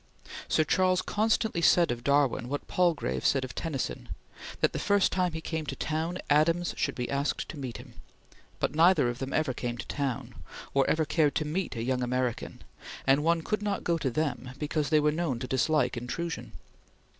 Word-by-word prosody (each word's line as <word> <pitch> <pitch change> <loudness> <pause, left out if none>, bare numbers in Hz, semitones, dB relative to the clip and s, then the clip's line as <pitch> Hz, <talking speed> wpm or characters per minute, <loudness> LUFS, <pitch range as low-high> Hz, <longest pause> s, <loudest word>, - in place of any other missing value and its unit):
Sir 155 - +3
Charles 185 +3 +2
constantly 220 -3 +1
said 170 -2 +5
of 120 0 -4
Darwin, 140 -3 +2
what 145 +1 -4
Palgrave 160 - +1
said 135 -1 +2
of 125 - -9
Tennyson, 150 -6 -4 0.5
that - - +2
the - - -2
first 200 -1 +3
time 180 -2 0
he 160 - -4
came 160 -1 -3
to 135 - -3
town, 160 +5 -2
Adams 165 +4 +3
should 140 - -1
be 125 - -3
asked 140 +1 -1
to 155 - -7
meet 130 -4 -5
him, - - -12 0.7
but - - 0
neither 160 -4 +5
of 120 +1 -5
them 135 0 -4
ever 155 -5 +1
came 120 -1 -4
to 120 - -6
town, 140 -4 -3 0.4
or 135 -1 +3
ever 160 0 +2
cared 150 -1 +2
to 155 - 0
meet 165 +2 -2
a 115 - -3
young 125 +1 0
American, 125 -1 -2 0.4
and 135 +2 +4
one 165 0 +2
could 215 +3 -1
not 205 -1 -2
go 170 -1 +1
to 135 - 0
them 130 -3 -2
because 150 -1 -1
they 155 - +5
were 150 0 +3
known 155 -5 -1
to 120 - -5
dislike 145 +4 +1
intrusion. 160 +8 -4
150 Hz, 195 wpm, -29 LUFS, 130-170 Hz, 0.7 s, said